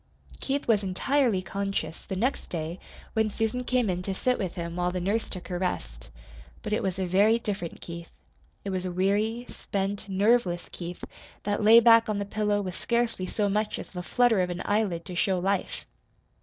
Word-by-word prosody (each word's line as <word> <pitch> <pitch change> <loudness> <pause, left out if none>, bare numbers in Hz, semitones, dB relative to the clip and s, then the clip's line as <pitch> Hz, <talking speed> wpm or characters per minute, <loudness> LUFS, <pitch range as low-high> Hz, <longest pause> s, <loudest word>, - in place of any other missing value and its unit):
Keith 280 +1 -2
was 220 -3 +4
entirely 205 +2 +1
conscious 195 -5 -3
the 190 - -3
next 245 +8 -1
day 165 +1 -4 0.3
when 220 -1 +2
Susan 225 +4 -1
came 250 -2 +1
in 180 -1 -1
to 190 +1 -3
sit 250 +5 +1
with 185 -5 -3
him 170 -1 -4
while 180 0 0
the 180 - -2
nurse 200 +5 -1
took 185 -2 -7
her 180 -2 -3
rest. - - -3 0.5
But 210 - -2
it 215 - +1
was 190 -1 -1
a 190 - 0
very 200 +5 +4
different 200 -7 -4
Keith. 170 0 -8 0.6
It 200 - -2
was 185 -1 -2
a 185 - -3
weary, 205 +6 +1
spent, 200 +1 -3
nerveless 195 -2 +2
Keith 175 0 -7 0.4
that 205 +1 -1
lay 220 +2 +9
back 230 -1 +6
on 210 - 0
the 200 - -2
pillow 205 0 0
with 185 -2 -4
scarcely 235 -5 0
so 205 +2 0
much 210 +2 0
as - - -7
the 180 - -6
flutter 225 +4 +3
of 180 - 0
an 175 0 -4
eyelid 200 -6 0
to 180 - -6
show 185 +1 +2
life. 195 +1 -1
195 Hz, 195 wpm, -27 LUFS, 180-220 Hz, 0.6 s, lay